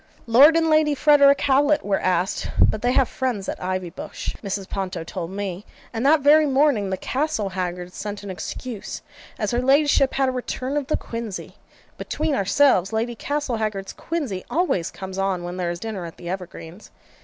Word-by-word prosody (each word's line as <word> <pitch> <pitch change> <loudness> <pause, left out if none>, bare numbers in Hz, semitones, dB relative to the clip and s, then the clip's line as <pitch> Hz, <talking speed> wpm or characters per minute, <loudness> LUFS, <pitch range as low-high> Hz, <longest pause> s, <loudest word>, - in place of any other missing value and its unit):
'Lord 270 +7 +7
and 325 0 +2
Lady 310 -2 +3
Frederick 280 -1 +5
Howlet 285 +2 +3
were 200 -1 +1
asked, 185 0 0
but 215 - +3
they 245 +1 +2
have 265 -2 +3
friends 245 -7 -3
at - - -4
Ivybush,' 185 -2 -4
Mrs. 195 -2 -4
Ponto 185 -3 -4
told 170 0 -5
me; 195 -1 -5 0.3
and 225 +1 -2
that 295 +2 +5
very 300 +2 +6
morning, 265 -7 +2
the 190 - -2
Castlehaggards 185 - -3
sent 205 0 -6
an 200 - -5
excuse, 215 +4 -6 0.3
as 210 -5 -1
her 240 0 +1
ladyship 275 0 +3
had 270 -1 +2
a - - 0
return 255 +2 -4
of 290 -3 -1
the - - +1
quinsy. 230 -4 -6 0.5
Between 310 0 -2
ourselves, 200 -2 +3
Lady 225 +2 -1
Castlehaggard's 220 -8 -3
quinsy 275 - -4
always 320 - 0
comes 190 0 -7
on 190 -2 0
when 175 +1 -5
there 180 -2 -1
is 170 0 -4
dinner 215 -4 -5
at 165 - -12
the 175 - -8
Evergreens. 180 0 -7
220 Hz, 175 wpm, -23 LUFS, 190-280 Hz, 0.5 s, Lord